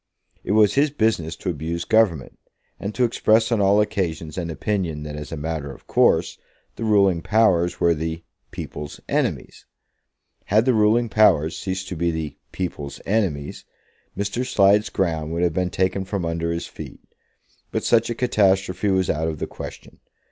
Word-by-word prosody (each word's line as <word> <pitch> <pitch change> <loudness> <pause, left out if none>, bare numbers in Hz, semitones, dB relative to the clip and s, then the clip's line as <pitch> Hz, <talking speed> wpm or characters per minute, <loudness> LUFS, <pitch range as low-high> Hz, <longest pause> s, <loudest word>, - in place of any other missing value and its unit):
It 100 - -1
was 105 -2 +5
his 145 +2 +3
business 110 - 0
to 90 - -3
abuse 85 +2 -4
Government, 100 - +1 0.4
and 100 +2 -5
to 125 - +2
express 115 -1 +2
on 115 -3 +2
all 100 +1 +4
occasions 85 -6 -2
an 85 -2 -3
opinion 85 -3 -2
that 75 -1 -6
as 75 0 -7
a 80 - -4
matter 75 -2 -4
of 65 - -14
course - - +2 0.4
the - - -6
ruling 100 -5 +3
powers 90 -5 +2
were 85 - +4
the 80 +1 -4 0.3
"people's 75 0 -7
enemies." - - -2 0.8
Had 110 +3 +3
the 130 - +3
ruling 110 +2 +3
powers 95 -8 +3
ceased 95 -1 -4
to 90 - -4
be 85 +1 0
the 80 -3 -4 0.2
"people's 75 -6 -5
enemies," 95 -9 -1 0.5
Mr. 100 +5 -2
Slide's 105 -3 +3
ground 80 -4 -1
would 85 +1 0
have 85 -3 +1
been 90 +1 0
taken 95 +1 0
from 95 -2 -3
under 85 0 -2
his 85 0 -3
feet. - - -10 0.7
But - - -2
such 115 0 +3
a 120 - -2
catastrophe 95 -5 +1
was 95 -1 +2
out 80 +1 0
of 80 -2 -3
the - - -3
question. - - -10
95 Hz, 170 wpm, -22 LUFS, 80-105 Hz, 0.8 s, was